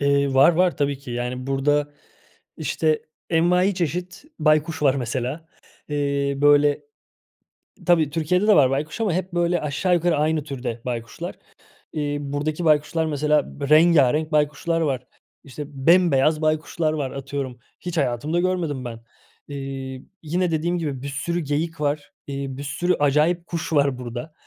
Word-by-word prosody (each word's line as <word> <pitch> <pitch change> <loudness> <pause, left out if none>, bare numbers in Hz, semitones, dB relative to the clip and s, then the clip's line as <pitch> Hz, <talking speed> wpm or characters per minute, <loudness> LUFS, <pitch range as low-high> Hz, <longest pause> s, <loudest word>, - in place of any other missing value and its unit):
Eee, 140 -1 +2
var, 140 +6 +7
var 180 +1 +2
tabii 140 -1 0
ki. 135 -3 -10
Yani, 125 +2 -3
burada, 145 +2 +1 0.6
işte, 155 -1 0 0.3
envaiçeşit 180 - +1
baykuş 155 0 +2
var 135 -2 +4
mesela. 130 +5 -3 0.4
Eee, 140 -1 0
böyle 145 - +4 1.0
Tabii 160 -4 +4
Türkiye'de 170 +6 +1
de 210 - +6
var 135 -3 +5
baykuş 150 +9 -3
ama 215 -6 +1
hep, 185 +1 -2
böyle, 175 0 +1
aşağı 155 +5 0
yukarı 175 -2 +2
aynı 155 0 +1
türde 125 -5 -5
baykuşlar. 115 -2 -5 0.6
Eee, 145 -1 -1
buradaki 150 +4 -3
baykuşlar 155 +1 +2
mesela 150 -1 0
b 140 - -2
rengârenk 155 -1 +5
baykuşlar 150 +3 +1
var. 130 -5 -1 0.4
İşte, 140 +2 -7
bembeyaz 155 0 +3
baykuşlar 155 +1 0
var 140 -4 -2
atıyorum. 135 -2 -5 0.2
Hiç 175 -1 -5
hayatımda 140 +5 0
görmedim 170 -8 -1
ben. 115 -1 -6 0.5
Eee, 135 -2 -6 0.2
yine 175 +3 0
dediğim 170 +3 0
gibi 145 -6 -3
bir 140 - -5
sürü 145 +5 -2
geyik 155 +1 -2
var, 145 0 -1 0.2
eee, 140 -1 -4
bir 140 - -6
sürü 175 +6 0
acayip 155 +5 +2
kuş 165 -1 -4
var 140 -3 +2
burada. 125 +5 -7
150 Hz, 145 wpm, -23 LUFS, 140-165 Hz, 1.0 s, var